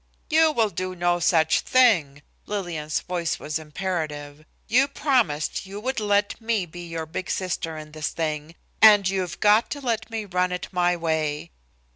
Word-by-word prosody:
"You 320 0 +5
will 225 -7 +1
do 185 +1 -4
no 175 0 +1
such 165 -2 +3
thing." 165 - +3 0.2
Lillian's 170 -7 -3
voice 175 -2 -2
was 155 +1 -4
imperative. 155 -3 -5 0.2
"You 255 +5 +4
promised 235 - 0
you 200 +1 -7
would 255 +3 -2
let 205 +1 0
me 225 -4 0
be 175 +1 -9
your 165 -1 -4
big 170 +4 -6
sister 175 -3 -2
in 155 0 -9
this 155 0 -3
thing, 155 0 -4 0.3
and 205 -3 +8
you've 185 -3 -2
got 210 +2 +4
to 290 - -4
let 230 -5 -2
me 225 -2 -4
run 180 -1 0
it 180 0 -4
my 180 -1 +1
way!" 155 - -2
180 Hz, 165 wpm, -24 LUFS, 160-210 Hz, 0.3 s, and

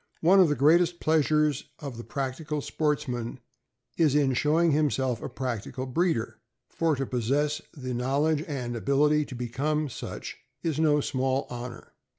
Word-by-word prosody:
One 185 +4 +6
of 180 -4 +6
the 150 - +1
greatest 170 +5 +4
pleasures 150 -2 +2
of 140 -4 -7
the 115 - -7
practical 140 +4 -3
sportsman 140 -5 -2 0.6
is 155 -4 +3
in 140 -3 +3
showing 160 +5 +3
himself 135 -5 +1
a - - -5
practical 130 0 -4
breeder, 145 -2 -1 0.3
for 165 -2 +1
to 135 0 -2
possess 140 +5 0 0.2
the 130 -2 -4
knowledge 140 +5 +1
and 125 -5 -3
ability 145 +7 +2
to 130 - -8
become 140 +5 -1
such 120 - -7 0.3
is 160 -3 -1
no 150 -2 +3
small 135 0 0
honor. 120 -1 -8
145 Hz, 150 wpm, -27 LUFS, 130-155 Hz, 0.6 s, One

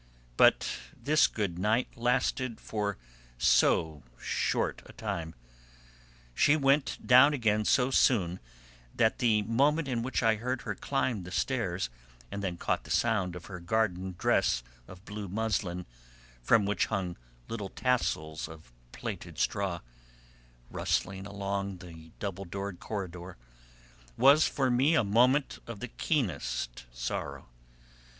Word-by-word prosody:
But - - +5 0.3
this 155 +2 +4
good 95 -6 -3
night 110 +6 +1
lasted 125 0 0
for 105 -3 -3 0.4
so 75 +4 +3 0.2
short - - -1
a - - -13
time: 80 -1 -4 1.0
she 145 - +4
went 140 0 +1
down 130 +4 +7
again 110 -4 +1
so 130 +3 +3
soon 95 -10 +3 0.6
that 110 -1 +2
the 110 -3 +3
moment 140 +8 +2
in 120 -3 -1
which 130 +1 -1
I 110 -1 +4
heard 125 +3 -3
her 105 - -3
climb 125 -2 -1
the 90 - -8
stairs, 95 - -1 0.4
and 100 - -4
then 90 -3 -2
caught - - -1
the - - -14
sound 100 -6 +1
of 90 - -9
her 90 -3 -8
garden 95 -1 -1
dress - - +2 0.2
of 95 +2 -13
blue 105 -1 -6
muslin, 95 -3 -2 0.6
from 105 - +4
which 100 -1 +1
hung 95 -5 -2 0.3
little 105 -4 -5
tassels 80 -14 -1
of 80 -6 -13 0.2
plaited - - -6
straw, 95 -4 -1 0.9
rustling 95 +1 -1
along 100 -1 -3
the 85 -3 -12
double 100 -1 -4
doored 100 +1 -5
corridor, 90 -3 -6 0.8
was 140 +4 +6
for 130 -2 0
me 135 +7 +3
a 135 - +4
moment 125 +7 +3
of 115 -3 -7
the 125 - -5
keenest 90 - -2
sorrow. - - -5
105 Hz, 130 wpm, -30 LUFS, 90-125 Hz, 1.0 s, down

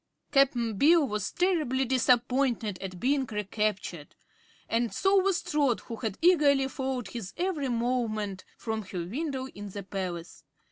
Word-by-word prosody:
Cap'n 240 -7 +2
Bill 320 0 +5
was 210 -2 -2
terribly 310 -8 +1
disappointed 245 -4 +2
at 185 -2 -6
being 270 +3 +1
recaptured, 210 -6 -3 0.5
and 230 0 0
so 390 +1 +3
was 375 -3 +2
Trot, 295 -8 +1
who 230 - -7
had 220 -4 -3
eagerly 290 -6 +5
followed 260 -5 -3
his 210 -3 -6
every 340 -7 -1
movement 230 -5 -1
from 220 -1 -3
her 185 -4 -5
window 265 - -3
in 205 -3 -8
the 200 +1 -6
palace. 175 -4 -5
240 Hz, 140 wpm, -28 LUFS, 205-280 Hz, 0.5 s, Bill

